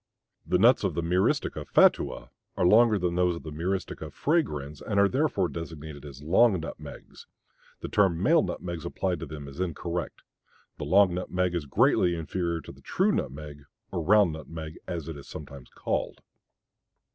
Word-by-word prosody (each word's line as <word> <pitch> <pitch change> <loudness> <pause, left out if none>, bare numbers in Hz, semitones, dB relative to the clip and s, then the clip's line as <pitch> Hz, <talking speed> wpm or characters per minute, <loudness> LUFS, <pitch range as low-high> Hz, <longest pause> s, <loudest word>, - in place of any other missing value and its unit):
The 90 - +3
nuts 120 +6 +5
of 90 -5 -1
M. 85 0 -2 0.6
fatua - - +3 0.3
are - - +2
longer 110 +3 +6
than 90 -2 -1
those 90 0 +2
of 85 - -10
M. 80 - -6
fragrans 85 - -2
and 100 -1 -1
are 100 - +6
therefore 130 - +1
designated 80 -2 -8
as 70 -1 -10
long 95 +5 +4
nutmegs; 80 - -9 0.5
the - - -4
term 95 -5 +2
"male 160 - +4
nutmegs" 85 -3 -4
applied 90 +1 -2
to - - -6
them 75 -2 -8
is 70 +4 -10
incorrect. 85 -2 -3 0.6
The - - -3
long 95 +3 +5
nutmeg 90 0 -1
is 85 -5 -3
greatly 85 +5 +3
inferior 85 0 -2
to - - -10
the - - -17
true - - +1
nutmeg, 75 0 -4 0.3
or - - -2
round 100 -1 +4
nutmeg 80 0 -8
as 85 -3 -4
it 80 - -5
is 70 - -12
sometimes 70 -4 -10
called. - - -3
85 Hz, 160 wpm, -27 LUFS, 75-95 Hz, 0.6 s, longer